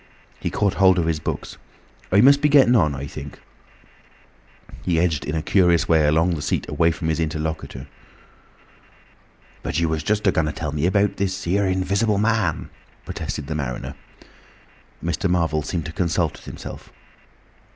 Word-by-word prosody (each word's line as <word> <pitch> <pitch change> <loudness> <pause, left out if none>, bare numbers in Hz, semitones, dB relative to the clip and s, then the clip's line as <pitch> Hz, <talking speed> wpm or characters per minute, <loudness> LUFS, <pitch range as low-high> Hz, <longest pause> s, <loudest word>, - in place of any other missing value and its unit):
He - - -2
caught 100 -2 0
hold 95 -1 +4
of 85 - +1
his 80 -2 0
books. - - -5 0.5
"I 100 +2 +5
must 140 +3 +6
be 150 - +3
getting 135 -4 +6
on, 75 -10 +3
I 70 +1 -5
think," - - -8 1.3
he - - -18
said. - - -11
He 85 -3 +2
edged 80 -5 0
in 75 - -3
a 80 - -1
curious 90 -3 +3
way 80 -2 +4
along 80 +4 +3
the 75 - -4
seat 70 - -2
away 85 -1 +2
from 80 0 -3
his 80 0 0
interlocutor. 80 -4 -3 1.8
"But 75 - -2
you 85 - +1
was 80 -1 -1
just 105 +3 0
a 95 - +5
going 80 -2 +1
to 75 - -3
tell 75 -1 -4
me 75 +3 0
about 100 +2 +1
this 95 0 -2
here 95 +3 +1
Invisible 100 +3 +1
Man!" 105 -5 0 0.3
protested - - -5
the 80 - -4
mariner. 70 -5 -4 1.1
Mr. 85 +2 -1
Marvel 80 -3 +1
seemed 80 +1 -3
to 80 - -5
consult 85 -1 0
with - - -15
himself. - - -9
85 Hz, 175 wpm, -22 LUFS, 80-95 Hz, 1.8 s, must